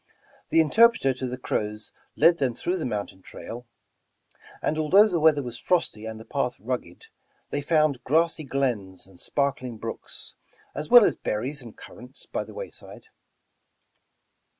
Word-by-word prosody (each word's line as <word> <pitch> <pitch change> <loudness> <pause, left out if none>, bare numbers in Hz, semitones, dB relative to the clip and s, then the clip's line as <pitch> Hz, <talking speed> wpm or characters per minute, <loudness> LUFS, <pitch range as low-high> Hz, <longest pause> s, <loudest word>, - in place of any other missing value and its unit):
The 165 - +5
interpreter 185 - +4
to 130 0 -4
the 125 +1 -5
Crows 105 -3 -3 0.2
led 170 0 +5
them 130 -4 0
through 180 +9 -1
the 155 - -2
mountain 100 -4 -4
trail, 120 +5 -9 0.9
and 155 - -1
although 190 +8 +6
the 180 -5 0
weather 155 -2 +4
was 120 -1 -6
frosty 110 -11 0
and 110 0 -7
the 110 - -11
path 125 -3 -1
rugged, 125 - -5 0.5
they 145 - -1
found 155 -3 +2
grassy 165 +3 +2
glens 120 -10 -2
and 95 -2 -14
sparkling 135 -4 -2
biooks, 115 +1 -7 0.4
as 150 - -5
well 245 -3 +9
as - - +3
berries 130 +7 -3
and 115 -3 -11
currants 125 +3 -11
by - - -3
the - - -13
wayside. - - -8
135 Hz, 150 wpm, -26 LUFS, 115-155 Hz, 0.9 s, well